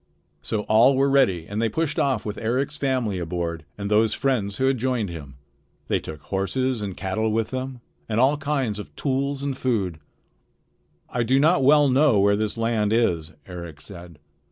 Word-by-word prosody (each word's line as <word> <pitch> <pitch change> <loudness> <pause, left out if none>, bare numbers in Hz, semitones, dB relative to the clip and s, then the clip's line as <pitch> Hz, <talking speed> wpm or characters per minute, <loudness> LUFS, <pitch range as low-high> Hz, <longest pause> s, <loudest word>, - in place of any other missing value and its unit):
So 110 - -2
all 115 +6 +4
were 135 +1 +2
ready 95 -12 +3
and 105 +2 -3
they 115 - +1
pushed 155 +6 -1
off 130 -5 0
with 105 -1 -4
Eric's 130 +6 -1
family 130 -9 -1
aboard 85 -2 -4
and 100 -1 -4
those 110 0 +3
friends 110 -8 -1
who 130 - +1
had 135 -2 +2
joined 120 -5 -1
him. 70 -5 -9 0.5
They - - +2
took 75 -2 -9
horses 120 +5 -1
and 100 -3 -5
cattle 110 +4 -1
with 110 0 -1
them, 130 -1 -5 0.3
and 110 +1 0
all 135 +4 +4
kinds 140 -7 -1
of 105 - -10
tools 140 0 -1
and 140 -1 -2
food. 100 -11 -1 1.1
"I 125 - -2
do 130 +4 +3
not 150 -1 +4
well 145 +2 +6
know 135 -4 +4
where 100 +1 +4
this 110 +1 -2
land 115 -2 0
is," 85 -9 +1
Eric 85 -4 -8
said. 85 -2 -11
115 Hz, 180 wpm, -24 LUFS, 100-135 Hz, 1.1 s, well